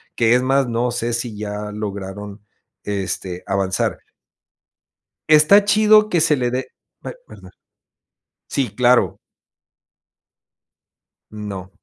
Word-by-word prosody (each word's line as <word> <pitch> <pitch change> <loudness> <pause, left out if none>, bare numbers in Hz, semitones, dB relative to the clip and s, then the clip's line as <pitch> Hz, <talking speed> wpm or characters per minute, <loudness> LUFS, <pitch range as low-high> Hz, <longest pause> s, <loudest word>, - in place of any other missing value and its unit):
que 115 0 +3
es 125 - +3
más 135 +1 +2
no 120 +1 -1
sé 120 0 -2
si 115 -2 -4
ya 105 0 -5
lograron, 100 -1 -6 0.4
este, 95 -2 -4
avanzar. 95 -1 -1 1.3
Está 155 +7 +6
chido 215 0 +5
que 175 -5 +1
se 150 -1 +3
le 125 -1 0
dé 130 +1 -3 0.4
b - - -5
ay, - - -7
perdón. - - -14 1.0
Sí, 130 -8 -2
claro. 125 0 +3 2.1
No. 100 -3 -7
115 Hz, 110 wpm, -20 LUFS, 105-135 Hz, 2.1 s, Está